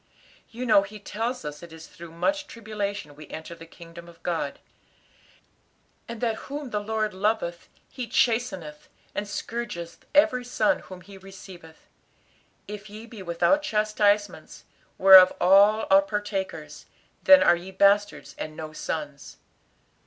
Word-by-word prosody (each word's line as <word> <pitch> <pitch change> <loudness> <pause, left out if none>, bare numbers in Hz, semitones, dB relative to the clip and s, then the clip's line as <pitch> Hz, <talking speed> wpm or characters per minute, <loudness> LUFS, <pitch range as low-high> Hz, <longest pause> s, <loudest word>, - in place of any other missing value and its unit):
You 240 +2 -6
know 220 -4 +5
He 205 +2 -9
tells 225 0 -4
us 150 0 -7
it 170 -1 -12
is 160 0 -11
through 170 0 -12
much 290 - -2
tribulation 205 - -5
we 150 0 -12
enter 160 +2 -8
the 165 0 -13
kingdom 170 +1 -13
of 170 -1 -17
God; 165 -5 -3 1.5
and 230 -1 -8
that 225 -2 -1
whom 285 -2 -6
the 210 - -1
Lord 215 0 -2
loveth 190 -3 -2 0.2
He 255 -3 -7
chasteneth, 190 -14 -1 0.3
and 205 - -4
scourgeth 205 -6 -6
every 295 -4 +4
son 225 -3 +1
whom 185 -1 -12
he 195 +2 -14
receiveth. 190 -4 -14 0.8
'If 210 0 -8
ye 215 +2 -10
be 230 -3 -11
without 185 - +1
chastisements, 210 -5 0 0.3
whereof 190 -1 +9
all 200 +4 +5
are 195 0 +7
partakers, 205 -1 -5 0.3
then 285 0 +7
are 175 - +5
ye 175 +2 -9
bastards 200 +2 +2
and 155 0 -6
no 155 -1 -7
sons!" 145 -3 -6
200 Hz, 140 wpm, -25 LUFS, 170-220 Hz, 1.5 s, whereof